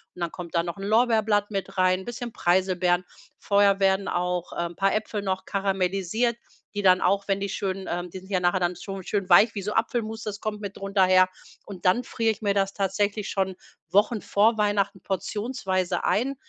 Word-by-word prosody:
Und 180 - -10
dann 170 -1 -1
kommt 175 -1 -8
da 170 - +3
noch 170 +3 -5
'n 195 - -7
Lorbeerblatt 220 -2 +2
mit 195 -1 -4
rein, 185 0 +2
bisschen 240 0 -5
Preiselbeeren. 180 -1 +1 0.3
Vorher 200 -1 +3
werden 195 0 +2
auch, 180 0 -2
ähm, 170 0 -3
paar 195 0 +2
Äpfel 215 -1 -3
noch 190 -1 -2
karamellisiert, 195 +4 0 0.4
die 205 -1 -3
dann 185 -1 +5
auch, 200 0 +1
wenn 195 -1 0
die 200 - -2
schön, 195 -1 -3
ähm 175 +1 -3
die 185 - -8
sind 190 +1 -16
ja 185 - +2
nachher 180 +1 +2
dann 175 0 0
schon 195 -1 -7
schön 200 0 -2
weich 210 +6 +6
wie 200 - -3
so 210 +2 -3
Apfelmus, 225 -1 -1
das 210 -1 -5
kommt 210 -1 -4
mit 200 -1 -6
drunter 195 0 +1
her. 185 0 +5 0.4
Und 190 -3 -10
dann 190 +7 +3
frier 225 -1 0
ich 220 - -8
mir 200 -2 +1
das 195 -1 +1
tatsächlich 205 +1 -1
schon 190 -1 -1 0.4
Wochen 210 +2 +3
vor 220 +3 +2
Weihnachten 205 -2 0
portionsweise 190 -3 -2
ein, 265 +5 +1
195 Hz, 200 wpm, -25 LUFS, 185-210 Hz, 0.4 s, weich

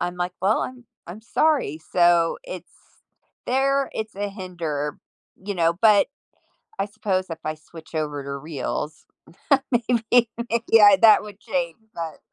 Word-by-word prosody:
I'm, 175 0 -3
like, 180 0 -2
"Well, 205 +4 +3
I'm 255 -1 -7 0.2
I'm 180 +5 -9
sorry." 255 - +1
So, 175 -1 +4
it's - - -9 0.7
there 275 +2 +1
it's 215 -2 -5
a 205 0 -2
hinder, 170 -7 -4 0.4
you 200 +2 -6
know, 165 -2 +2
but 210 +3 +4 0.7
I - - +1
suppose 200 -3 -2
if 165 - -6
I 155 0 -2
switch 160 +1 -15
over 150 -2 -2
to 140 0 -5
Reels, 150 +1 -5 0.7
maybe, 235 0 +2 0.4
yeah, 210 -3 +8
that 220 -2 +8
would 210 -1 -11
change, 180 -7 -2 0.2
but 165 -2 -6
185 Hz, 140 wpm, -23 LUFS, 165-220 Hz, 0.7 s, yeah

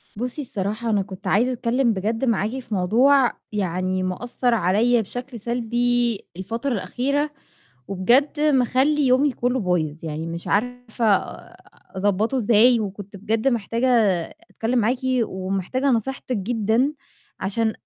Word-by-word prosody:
بُصي 250 +7 -4
الصراحة 215 -1 -3
أنا 210 -2 +2
كنت 190 -1 -8
عايزة 240 +6 +2
أتكلِّم 245 0 +1
بجد 220 +6 -1
معاكِ 230 +1 0
في 240 -4 -8
موضوع، 245 +8 +4 0.2
يعني 185 -2 -1
مأثَر 240 +6 -1
عليّا 225 +4 +2
بشكل 245 +3 -7
سلبي 240 0 0 0.2
الفترة 230 +8 -3
الأخيرة، 260 +9 -1 0.6
وبجد 245 +11 +2
مخلّي 285 0 +2
يومي 260 +3 +3
كُلّه 250 +1 -1
بايظ، 165 -4 -1
يعني 160 +1 -4
مش 170 +1 -6
عارفة 245 +1 -1 0.9
أضبطُه 205 +6 +1
إزاي، 235 +1 +4
وكنت 200 -1 -6
بجد 220 +5 0
محتاجة 235 +1 0 0.6
أتكلِّم 240 +3 -1
معاكِ، 240 +3 +1 0.3
ومحتاجة 195 +9 -2
نصيحتِك 250 +2 -1
جدًا، 225 +6 +1 0.5
عشان 220 +3 0
230 Hz, 120 wpm, -22 LUFS, 195-250 Hz, 0.9 s, موضوع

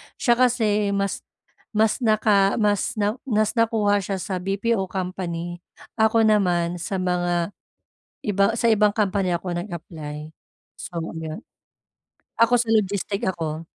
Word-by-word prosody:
Siya 240 0 +2
kasi 215 -5 +2
mas 200 0 -1 0.6
mas 220 +3 +2
naka 215 -4 +3
mas 210 +1 +1
na, 210 +3 -1
mas 215 -3 +2
nakuha 215 -3 +2
siya 195 0 -3
sa 190 -3 -3
BPO 195 +2 -1
company. 175 -2 -4 0.4
Ako 220 +1 +4
naman 180 -5 +2
sa 190 +3 -3
mga 175 0 0 0.7
iba, 205 +2 +2
sa 230 0 +3
ibang 210 -1 +4
company 195 -4 +1
ako 180 +1 -5
nag-apply. 160 -4 -6 0.5
So 175 - -8 0.2
iyon 160 +5 -6 0.9
ako 230 +1 +4
sa 235 - 0
logistic 200 -2 0
ako. 160 -2 -4
200 Hz, 125 wpm, -23 LUFS, 175-215 Hz, 0.9 s, Ako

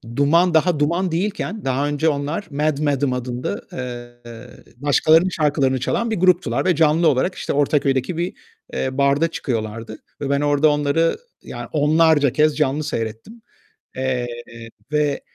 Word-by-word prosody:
Duman, 165 +5 +3
daha 160 -1 +2
Duman 170 +4 0
değilken, 205 +3 -3
daha 135 +2 0
önce 145 +2 +1
onlar 150 +6 -3
Mad 150 0 0
Madame 140 -3 0
adında, 125 -4 -4
eee, 120 -1 -9
başkalarının 155 +5 +3
şarkılarını 145 -5 +1
çalan 230 - -1
bir - - +1
gruptular 185 0 +2
ve 180 -3 +3
canlı 160 +1 +3
olarak 155 +7 +1
işte - - -3
Ortaköy'deki 140 +1 +1
bir, 175 +1 -2 0.4
eee, 130 0 -3
barda 140 +4 +3
çıkıyorlardı 115 -6 -4 0.2
ve 140 - -2
ben 140 0 +1
orada 145 +1 +3
onları 145 +3 +1 0.3
ya - - -8
onlarca 150 -2 +3
kez 150 +1 +2
canlı 150 0 0
seyrettim. 115 - -5 0.5
Eee, 130 -2 -1 0.6
ve 150 -2 0
145 Hz, 140 wpm, -21 LUFS, 130-165 Hz, 0.6 s, Duman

